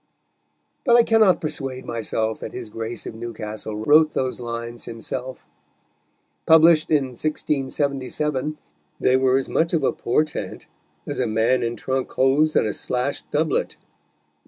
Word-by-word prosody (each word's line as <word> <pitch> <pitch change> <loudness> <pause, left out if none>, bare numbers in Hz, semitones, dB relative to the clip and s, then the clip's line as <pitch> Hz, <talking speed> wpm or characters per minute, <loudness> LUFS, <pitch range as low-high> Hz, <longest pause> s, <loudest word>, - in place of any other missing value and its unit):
But 235 - +5
I 240 - +7
cannot 220 -5 +4
persuade 135 -4 -4
myself 110 -1 -2
that - - -7
his 120 -4 -7
Grace 115 +2 -5
of - - -6
Newcastle 110 -2 -6
wrote 155 +1 +5
those 130 -1 -1
lines 120 0 -5
himself. 125 +2 -6 1.0
Published 160 0 +6
in 145 -4 +2
1677, 140 +1 -2 0.4
they 130 - +3
were 130 0 +3
as 135 - -2
much 165 +1 0
of 160 -4 +1
a - - +3
portent 150 +5 -2 0.4
as - - -4
a - - +1
man 110 +4 +2
in 115 0 -2
trunk 130 +3 -2
hose 145 +4 +3
and - - +4
a 105 - -1
slashed 125 +3 -3
doublet. 155 +1 0
130 Hz, 140 wpm, -23 LUFS, 120-155 Hz, 1.0 s, I